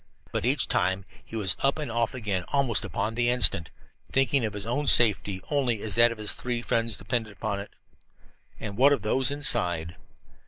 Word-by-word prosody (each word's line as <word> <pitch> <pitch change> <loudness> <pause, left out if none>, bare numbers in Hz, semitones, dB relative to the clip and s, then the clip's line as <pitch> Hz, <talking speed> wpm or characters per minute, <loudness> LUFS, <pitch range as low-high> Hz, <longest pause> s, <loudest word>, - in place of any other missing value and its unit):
But - - -3
each 135 +4 +1
time 95 -3 -1 0.2
he - - -11
was 100 -5 +1
up 135 +2 +1
and 150 -6 -5
off 115 +2 -1
again 100 -7 -3
almost 135 -6 +2
upon 110 - -3
the 120 +1 0
instant, 100 -9 +4 0.4
thinking 135 0 +2
of 110 -1 -3
his 105 0 -6
own 140 +5 -2
safety 105 -6 +3
only 125 -7 -1
as 105 - -1
that 115 +2 +5
of 115 - -7
his 105 -1 +1
three 120 -1 -4
friends 115 -2 -1
depended 110 +1 -3
upon 100 0 -4
it. 100 - -8 0.9
And 105 -2 -7
what 140 +3 +5
of 140 - -3
those 125 +4 +1
inside? 90 - +1
115 Hz, 190 wpm, -26 LUFS, 100-125 Hz, 0.9 s, that